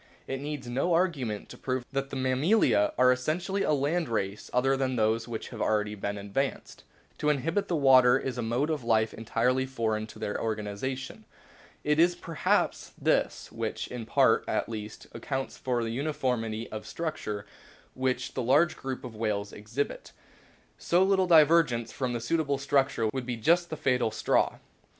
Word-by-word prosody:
It 135 Hz, 0 st, -4 dB
needs 145 Hz, -3 st, -5 dB
no 135 Hz, +8 st, +1 dB
arguments 140 Hz, -, -1 dB
to -, -, -11 dB
prove 130 Hz, -1 st, -2 dB
that 135 Hz, 0 st, -2 dB
the -, -, -6 dB
Mammalia 130 Hz, -, +3 dB
are 125 Hz, 0 st, +6 dB
essentially 170 Hz, +10 st, -1 dB
a -, -, +1 dB
land 150 Hz, +3 st, 0 dB
race 100 Hz, -2 st, -3 dB
other 135 Hz, +2 st, +2 dB
than 130 Hz, -1 st, -1 dB
those 115 Hz, +1 st, +1 dB
which 115 Hz, -2 st, -5 dB
have -, -, -7 dB
already 105 Hz, -1 st, +1 dB
been 100 Hz, 0 st, -4 dB
advanced. 100 Hz, +8 st, -3 dB, 0.4 s
To 150 Hz, -, +1 dB
inhabit 165 Hz, +8 st, 0 dB
the 175 Hz, -, 0 dB
water 130 Hz, -3 st, +6 dB
is 130 Hz, -2 st, -3 dB
a -, -, 0 dB
mode 120 Hz, +7 st, 0 dB
of 150 Hz, -5 st, -2 dB
life 110 Hz, -1 st, +2 dB
entirely 125 Hz, +4 st, 0 dB
foreign 110 Hz, -4 st, -1 dB
to -, -, -13 dB
their 105 Hz, -, -3 dB
organisation. 110 Hz, +5 st, -4 dB, 0.6 s
It 150 Hz, +1 st, +2 dB
is 175 Hz, +1 st, +5 dB
perhaps 165 Hz, -3 st, -1 dB
this -, -, 0 dB
which, -, -, -4 dB
in 120 Hz, -3 st, -6 dB
part -, -, +4 dB
at -, -, 0 dB
least, 110 Hz, -1 st, -7 dB
accounts 135 Hz, -1 st, -4 dB
for 125 Hz, -2 st, -1 dB
the 115 Hz, -, -2 dB
uniformity 125 Hz, -5 st, -2 dB
of 110 Hz, 0 st, -6 dB
structure 110 Hz, -11 st, -4 dB, 0.5 s
which 130 Hz, 0 st, -1 dB
the 130 Hz, -, -2 dB
large 145 Hz, +8 st, +3 dB
group 135 Hz, -1 st, -5 dB
of 120 Hz, -3 st, -8 dB
whales 105 Hz, -2 st, -2 dB
exhibits. 110 Hz, +7 st, -4 dB, 0.7 s
So 175 Hz, +2 st, +3 dB
little 190 Hz, -1 st, +3 dB
divergence 155 Hz, -7 st, +5 dB
from 130 Hz, -2 st, -2 dB
the 120 Hz, -, -2 dB
suit 165 Hz, +8 st, 0 dB
able 140 Hz, -3 st, 0 dB
structure 135 Hz, -4 st, +1 dB
would 130 Hz, -2 st, -4 dB
be 120 Hz, -2 st, -2 dB
just 170 Hz, +9 st, +3 dB
the 155 Hz, -, -5 dB
fatal 125 Hz, -5 st, +1 dB
straw. 110 Hz, -, +1 dB
130 Hz, 175 wpm, -28 LUFS, 115-150 Hz, 0.7 s, are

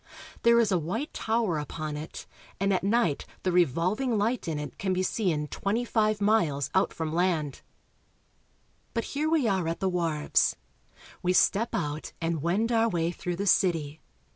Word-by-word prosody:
There 235 Hz, 0 st, +5 dB
is 220 Hz, -3 st, +2 dB
a 185 Hz, -, +3 dB
white 220 Hz, -, -3 dB
tower 220 Hz, -8 st, 0 dB
upon 150 Hz, +1 st, -5 dB
it, 150 Hz, +2 st, -7 dB, 0.3 s
and 195 Hz, +1 st, +2 dB
at 185 Hz, -, 0 dB
night 200 Hz, -7 st, +1 dB, 0.2 s
the 185 Hz, -, +1 dB
revolving 180 Hz, -, +1 dB
light 225 Hz, +2 st, 0 dB
in 160 Hz, -2 st, -1 dB
it 150 Hz, 0 st, -7 dB
can 190 Hz, -1 st, 0 dB
be 185 Hz, 0 st, 0 dB
seen 180 Hz, -7 st, 0 dB
twenty 225 Hz, +5 st, -1 dB
five 215 Hz, -2 st, +1 dB
miles 175 Hz, -, +1 dB
out 190 Hz, -, +2 dB
from 160 Hz, -1 st, -4 dB
land. 165 Hz, -5 st, 0 dB, 1.3 s
But 230 Hz, -, 0 dB
here 300 Hz, +3 st, 0 dB
we 315 Hz, -7 st, +2 dB
are 190 Hz, -5 st, +1 dB
at 165 Hz, -, -2 dB
the 190 Hz, -1 st, 0 dB
wharves. 165 Hz, -4 st, +1 dB, 0.7 s
We 180 Hz, 0 st, +1 dB
step 210 Hz, +5 st, +3 dB
out 150 Hz, -1 st, -3 dB
and 165 Hz, -2 st, -1 dB
wend 195 Hz, +9 st, +1 dB
our 230 Hz, 0 st, +3 dB
way 170 Hz, -3 st, 0 dB
through 175 Hz, 0 st, -4 dB
the 200 Hz, +3 st, -3 dB
city. 160 Hz, -6 st, +2 dB
185 Hz, 170 wpm, -28 LUFS, 165-220 Hz, 1.3 s, There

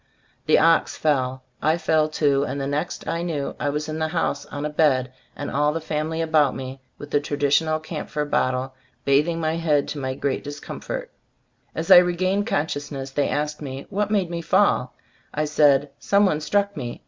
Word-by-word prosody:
The -, -, +6 dB
ox 165 Hz, +1 st, +3 dB
fell, 130 Hz, -4 st, 0 dB, 0.2 s
I 155 Hz, +3 st, +2 dB
fell 155 Hz, -2 st, +2 dB
too; 140 Hz, -3 st, +2 dB
and 140 Hz, -, -3 dB
the 135 Hz, -, -2 dB
next 145 Hz, +5 st, -3 dB
I 165 Hz, -, -1 dB
knew 160 Hz, -5 st, -3 dB
I 145 Hz, -, 0 dB
was 150 Hz, +1 st, -2 dB
in 155 Hz, 0 st, -4 dB
the 160 Hz, -, 0 dB
house 155 Hz, -3 st, -2 dB
on 145 Hz, +1 st, -5 dB
a -, -, -1 dB
bed, 130 Hz, -5 st, +2 dB, 0.2 s
and 145 Hz, -, -5 dB
all 150 Hz, +1 st, +2 dB
the 165 Hz, -, -2 dB
family 160 Hz, +1 st, -2 dB
about 155 Hz, -4 st, +3 dB
me, 130 Hz, 0 st, -7 dB, 0.2 s
with 145 Hz, +1 st, -10 dB
the 145 Hz, -, +3 dB
traditional 145 Hz, +2 st, +1 dB
camphor 150 Hz, -1 st, -4 dB
bottle, 130 Hz, -2 st, 0 dB, 0.3 s
bathing 150 Hz, +5 st, +2 dB
my 160 Hz, 0 st, 0 dB
head 150 Hz, -4 st, +1 dB
to 150 Hz, -, -4 dB
my 130 Hz, -1 st, -3 dB
great 140 Hz, 0 st, -2 dB
discomfort. -, -, -6 dB, 0.6 s
As 165 Hz, +4 st, -2 dB
I 185 Hz, -, +12 dB
regained 185 Hz, +3 st, +2 dB
consciousness 145 Hz, -, -2 dB
they 145 Hz, +1 st, 0 dB
asked 150 Hz, +1 st, -2 dB
me 135 Hz, -1 st, -6 dB
what 205 Hz, +1 st, 0 dB
made 195 Hz, -5 st, 0 dB
me 170 Hz, -1 st, -3 dB
fall? 175 Hz, -8 st, +2 dB, 0.4 s
I 155 Hz, +1 st, +1 dB
said 145 Hz, -2 st, +3 dB
"some 200 Hz, +1 st, +3 dB
one 155 Hz, -5 st, +1 dB
struck 200 Hz, +6 st, 0 dB
me." 120 Hz, -6 st, -5 dB
150 Hz, 190 wpm, -23 LUFS, 140-165 Hz, 0.6 s, I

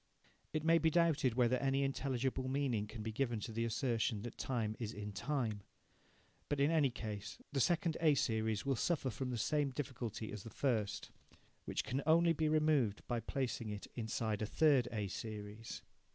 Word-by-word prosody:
It 155 Hz, -1 st, -1 dB
may 165 Hz, +1 st, +5 dB
be 160 Hz, +1 st, +4 dB
doubted 160 Hz, -7 st, +3 dB
whether 125 Hz, 0 st, +4 dB
any 135 Hz, +1 st, +1 dB
intelligible 130 Hz, -1 st, -1 dB
meaning 130 Hz, -6 st, 0 dB
can 110 Hz, 0 st, -7 dB
be 110 Hz, -, -3 dB
given 120 Hz, -1 st, 0 dB
to 115 Hz, -, -4 dB
the 115 Hz, +1 st, -1 dB
assertion 115 Hz, -2 st, 0 dB
that 120 Hz, -, -6 dB
time 115 Hz, -4 st, -1 dB
is 115 Hz, -2 st, -3 dB
in 105 Hz, 0 st, -5 dB
time. 120 Hz, -5 st, -1 dB, 0.9 s
But, 145 Hz, -, 0 dB
in 140 Hz, +3 st, +4 dB
any 155 Hz, -4 st, +4 dB
case, 105 Hz, -4 st, -6 dB
the 140 Hz, -, 0 dB
second 170 Hz, +3 st, +2 dB
A 155 Hz, -3 st, +5 dB
series 110 Hz, -4 st, 0 dB
will 135 Hz, -1 st, +2 dB
suffer 135 Hz, +1 st, 0 dB
from 125 Hz, +5 st, -3 dB
the 125 Hz, -, -2 dB
same 145 Hz, +5 st, +1 dB
difficulty 120 Hz, -5 st, -4 dB
as 105 Hz, -, -6 dB
the 115 Hz, -, -8 dB
first, 110 Hz, -6 st, -1 dB, 0.5 s
which -, -, -1 dB
can 135 Hz, +1 st, -1 dB
only 165 Hz, +1 st, +5 dB
be 155 Hz, -1 st, +1 dB
removed 150 Hz, -9 st, +2 dB
by 120 Hz, -1 st, 0 dB
placing 120 Hz, -1 st, -2 dB
it 105 Hz, -1 st, -5 dB
inside 110 Hz, -2 st, -2 dB
a 110 Hz, -, 0 dB
third 140 Hz, -2 st, +4 dB
A 105 Hz, -3 st, -1 dB
series. 105 Hz, +2 st, -6 dB
125 Hz, 180 wpm, -37 LUFS, 110-140 Hz, 0.9 s, may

